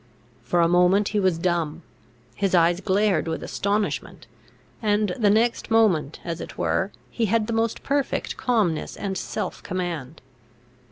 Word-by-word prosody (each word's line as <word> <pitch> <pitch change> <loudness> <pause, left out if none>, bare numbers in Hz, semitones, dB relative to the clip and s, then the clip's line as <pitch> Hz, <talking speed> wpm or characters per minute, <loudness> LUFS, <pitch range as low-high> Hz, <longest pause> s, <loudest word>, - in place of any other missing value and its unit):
For 170 +9 +1
a 170 - +4
moment 180 +4 +4
he 210 - 0
was 185 -4 +2
dumb; 170 -2 -1 0.5
his 195 +5 0
eyes 175 +1 +3
glared 195 -4 +1
with 160 0 -3
astonishment; 205 +1 -2 0.6
and 210 -1 +1
the 210 -4 +2
next 230 +3 +2
moment, 185 -10 +2
as 170 -1 -4
it - - -8
were, 195 +2 0 0.2
he 230 -2 0
had 225 +1 +2
the 230 - -3
most 225 0 -1
perfect 280 -1 -1
calmness 210 -11 0
and 195 -2 -3
self 195 0 -4
command. 170 -6 -4
190 Hz, 150 wpm, -24 LUFS, 170-215 Hz, 0.6 s, a